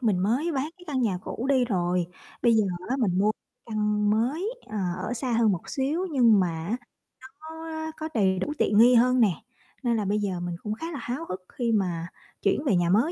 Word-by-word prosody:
mình 215 -7 +2
mới 250 - +1
bán 285 +3 -1
cái 355 - -14
căn 265 -4 -1
nhà 195 -6 +1
cũ 245 - -4
đi 260 -3 +4
rồi. 180 -5 0 0.4
Bây 235 -1 +5
giờ 220 -2 +4 0.2
á, 260 - 0
mình 200 -9 +1
mua 205 +2 +4 0.4
căn 210 -2 +1
mới, 290 - 0
ờ, 215 - -6 0.3
ở 245 - -2
xa 245 +1 -2
hơn 225 -2 +4
một 175 - -5
xíu 295 +7 -1
nhưng 235 -8 +5
mà 180 - +2 0.2
á, 220 +6 -1 0.5
nó - - -24
có 320 0 -6
có 315 0 -4
đầy 190 -4 +2
đủ 295 +10 -2
tiện 205 - +2
nghi 245 +3 +7
hơn 250 +2 +4
nè 205 -5 +4 0.5
nên 235 -2 +2
là 210 - -1
bây 205 +2 +1
giờ 195 -4 -2
mình 175 0 -3
cũng 210 - -2
khá 325 +10 -5
là 295 - -5
háo 260 +7 -4
hức 185 0 -4
khi 240 -2 -1
mà 180 -6 0 0.3
chuyển 200 +8 +1
về 250 - +3
nhà 175 -1 +2
mới 225 - +3
230 Hz, 230 wpm, -26 LUFS, 200-270 Hz, 0.5 s, nghi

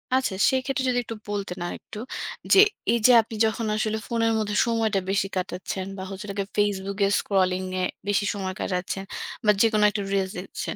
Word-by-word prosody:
আছে, 260 -7 +1 0.2
সেই 260 -1 +1
ক্ষেত্রে 270 0 -1
যদি 245 0 +2
একটু 225 - -6
বলতেন 195 -3 -3
আর - - -4
একটু 210 - -10 0.5
যে 390 - +8 0.3
এই 235 - +2
যে - - +7
আপনি 220 0 -9
যখন 220 +1 -1
আসলে 215 0 0
ফোনের 230 -1 +1
মধ্যে 210 -1 -2
সময়টা 225 -3 +1
বেশি 195 0 +1
কাটাচ্ছেন, 185 +1 -3
বা 190 - -5
হচ্ছে 195 +2 -7
কি - - +2
Facebook 200 -1 0
এ - - +3
scrolling 185 -1 +1
এ - - 0 0.2
বেশি 205 0 +2
সময় 190 -2 -3
কাটাচ্ছেন, 185 +1 -2 0.4
বা 210 - +7
যেকোনো 215 -2 +4
একটা 205 0 -3
reels 190 -1 0
দেখছেন, 190 - -5
205 Hz, 190 wpm, -25 LUFS, 190-225 Hz, 0.5 s, যে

